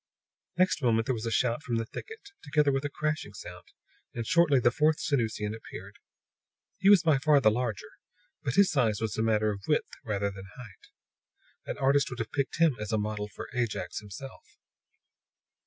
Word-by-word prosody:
Next 185 -3 +2
moment 115 -3 +2
there 130 - 0
was 115 -1 -4
a - - -2
shout 120 +3 +1
from 120 -5 -3
the 115 0 -1
thicket, 420 - -10
together 145 -1 +2
with 135 0 -1
a 145 - -2
crashing 150 -7 -3
sound; - - -10 0.5
and 115 -1 -3
shortly 150 -1 +4
the 120 0 +3
fourth 155 +3 +2
Sanusian 110 -6 -1
appeared. 110 - -10 0.8
He 195 +1 +4
was 200 -4 +7
by 155 -5 +3
far 150 +1 +4
the 110 -5 +4
larger; 120 +3 -4 0.4
but 140 -4 -2
his 200 -1 +5
size 115 -7 +1
was 110 -1 -2
a - - +1
matter 110 -1 +2
of 100 -1 -6
width 150 - 0
rather 100 -2 -1
than 95 -1 -10
of 95 - -16
height. 115 -6 -13 0.8
An - - -4
artist 140 +1 +2
would 125 - -7
have 115 -2 -4
picked 140 -2 -2
him 165 -5 +4
as 105 +1 -4
a 110 - +2
model 105 0 -2
for - - -9
Ajax 120 -7 -2
himself. 110 +6 -11
125 Hz, 190 wpm, -29 LUFS, 110-145 Hz, 0.8 s, was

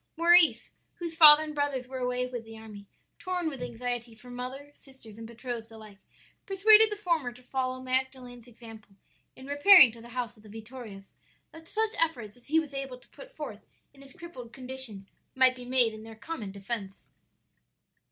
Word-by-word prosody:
"Maurice, 340 0 +4 0.2
whose 340 -2 -6
father 305 -2 +9
and 305 -1 -7
brothers 285 -4 -2
were 260 0 -6
away 250 0 -1
with 245 -2 -6
the 225 0 -12
army, 210 -2 -12 0.3
torn 360 -1 -3
with 270 -4 -9
anxiety 240 -1 -5
for 245 +2 -14
mother, 260 +4 -7
sisters, 235 -7 -15
and 225 - -8
betrothed 235 -1 -7
alike, 215 -3 -14 0.5
persuaded 430 +3 +6
the - - -2
former 335 -10 -1
to 250 +1 -17
follow 255 0 -3
Magdalen's 255 -2 -4
example 225 -4 -14 0.4
in 260 - -13
repairing 285 - +7
to 230 0 -14
the 235 - -13
house 240 -1 -3
of 215 - -21
the 215 - -16
Vittorias, 220 -2 -11 0.4
that 320 0 -14
such 440 +2 -1
efforts 245 -11 -2
as 245 -1 -12
he 315 +3 +3
was 305 -3 -6
able 270 -2 -5
to 250 - -23
put - - -14
forth - - -9 0.3
in 275 - -18
his 275 -1 -15
crippled 260 -9 -11
condition 255 -6 -6 0.3
might 260 -1 +4
be 250 -1 -10
made 245 -3 +2
in 215 - -10
their 225 0 -11
common 220 -4 -7
defence. 200 0 -7
250 Hz, 180 wpm, -28 LUFS, 230-290 Hz, 0.5 s, father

